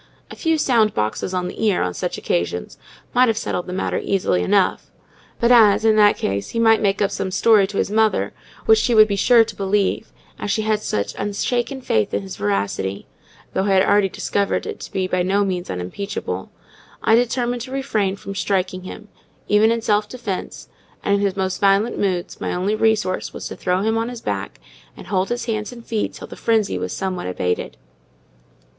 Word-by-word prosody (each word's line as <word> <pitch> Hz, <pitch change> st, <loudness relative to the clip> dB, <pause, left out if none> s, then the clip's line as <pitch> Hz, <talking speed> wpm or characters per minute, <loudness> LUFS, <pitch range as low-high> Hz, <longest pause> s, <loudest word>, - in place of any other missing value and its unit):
A -, -, -8 dB
few 325 Hz, -1 st, +1 dB
sound 230 Hz, -7 st, +2 dB
boxes 110 Hz, +11 st, -1 dB
on 180 Hz, -1 st, -1 dB
the 185 Hz, -, -6 dB
ear, 210 Hz, -4 st, +2 dB
on 90 Hz, 0 st, -2 dB
such -, -, -3 dB
occasions, 85 Hz, +1 st, -2 dB, 0.3 s
might 250 Hz, +1 st, +5 dB
have 225 Hz, -2 st, +1 dB
settled 180 Hz, -5 st, -3 dB
the -, -, -5 dB
matter 185 Hz, -, -1 dB
easily 180 Hz, -, +1 dB
enough: 90 Hz, -, +1 dB, 0.5 s
but 235 Hz, +1 st, +3 dB
as, 220 Hz, -3 st, +6 dB
in 220 Hz, -1 st, +5 dB
that 205 Hz, -1 st, +5 dB
case, 100 Hz, 0 st, -2 dB
he 230 Hz, -, -3 dB
might 225 Hz, -1 st, +4 dB
make 200 Hz, 0 st, +1 dB
up 195 Hz, -, 0 dB
some 190 Hz, -, -3 dB
story 205 Hz, +1 st, +4 dB
to 200 Hz, 0 st, -6 dB
his -, -, 0 dB
mother 215 Hz, -, +2 dB, 0.3 s
which 220 Hz, 0 st, +6 dB
she 235 Hz, +1 st, +1 dB
would 215 Hz, 0 st, +8 dB
be 200 Hz, -, -1 dB
sure 230 Hz, +3 st, +5 dB
to 225 Hz, -1 st, -8 dB
believe, 200 Hz, +2 st, 0 dB, 0.3 s
as -, -, -4 dB
she 215 Hz, -, 0 dB
had 215 Hz, -1 st, 0 dB
such 100 Hz, -, -2 dB
unshaken 240 Hz, +6 st, -2 dB
faith 110 Hz, -, 0 dB
in 100 Hz, -, -2 dB
his 95 Hz, -, -7 dB
veracity—though 100 Hz, -, -3 dB
I 195 Hz, -1 st, +2 dB
had 190 Hz, 0 st, +5 dB
already 205 Hz, -1 st, +3 dB
discovered 200 Hz, +1 st, -1 dB
it -, -, -6 dB
to -, -, -9 dB
be 190 Hz, -1 st, -1 dB
by 185 Hz, 0 st, 0 dB
no 195 Hz, +3 st, +2 dB
means 180 Hz, -2 st, -3 dB
unimpeachable—I 95 Hz, -, -4 dB
determined 245 Hz, +1 st, +1 dB
to 255 Hz, +2 st, -7 dB
refrain 220 Hz, -8 st, -1 dB
from 195 Hz, 0 st, -8 dB
striking 185 Hz, -2 st, -1 dB
him, 200 Hz, +3 st, -9 dB, 0.4 s
even 210 Hz, +2 st, +4 dB
in 230 Hz, 0 st, 0 dB
self 210 Hz, -1 st, +1 dB
defence; 230 Hz, -7 st, -5 dB, 0.4 s
and, 200 Hz, -, +1 dB
in 200 Hz, -, +2 dB
his 200 Hz, -1 st, 0 dB
most 190 Hz, 0 st, -2 dB
violent 200 Hz, +3 st, +3 dB
moods, 185 Hz, -3 st, -2 dB
my -, -, -2 dB
only 190 Hz, +4 st, 0 dB
resource 215 Hz, -3 st, 0 dB
was -, -, -6 dB
to -, -, -7 dB
throw 180 Hz, +1 st, 0 dB
him 225 Hz, +1 st, +1 dB
on 230 Hz, +1 st, -2 dB
his 245 Hz, -2 st, -8 dB
back -, -, -4 dB, 0.4 s
and -, -, -10 dB
hold 190 Hz, -1 st, 0 dB
his 240 Hz, 0 st, -2 dB
hands 215 Hz, -2 st, -3 dB
and 235 Hz, -1 st, -11 dB
feet 220 Hz, -2 st, -2 dB
till -, -, -9 dB
the -, -, -10 dB
frenzy 220 Hz, -3 st, +1 dB
was -, -, -4 dB
somewhat 185 Hz, -, -3 dB
abated. 90 Hz, 0 st, -2 dB
205 Hz, 200 wpm, -21 LUFS, 185-225 Hz, 0.5 s, would